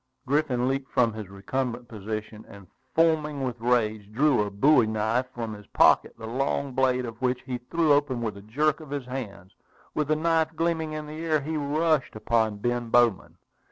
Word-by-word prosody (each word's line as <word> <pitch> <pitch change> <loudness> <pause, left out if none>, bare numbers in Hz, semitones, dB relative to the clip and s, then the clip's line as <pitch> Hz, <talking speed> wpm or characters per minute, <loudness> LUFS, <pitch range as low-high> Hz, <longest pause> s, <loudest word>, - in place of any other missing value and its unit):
Griffin 135 -3 +1
leaped 135 0 -2
from 115 -3 +2
his 105 -3 -7
recumbent 120 +5 -3
position, 110 0 -6
and, 100 -1 -13 0.3
foaming 155 -3 +2
with 125 -2 -3
rage, 110 -4 0
drew 135 +1 +3
a 105 - -1
bowie 120 +4 +4
knife 110 +4 0
from 115 -3 -5
his 105 -1 -11
pocket, - - +4
the 110 - -8
long 135 +3 -1
blade 130 -1 +1
of 115 0 -8
which 125 0 0
he 125 -2 -4
threw 165 -3 +3
open 145 -3 +1
with 110 -3 -3
a 100 - -10
jerk 145 +9 0
of 155 -3 -11
his 140 -2 -4
hand. 105 -7 -7 0.4
With 150 -2 -1
the 155 - +2
knife 160 0 +1
gleaming 160 -1 -1
in 155 0 -5
the 155 +2 -7
air, 155 -2 +1
he 155 +3 -4
rushed 150 -1 0
upon 110 -1 +1
Ben 120 +2 -2
Bowman. 120 -4 +2
125 Hz, 190 wpm, -26 LUFS, 110-150 Hz, 0.4 s, bowie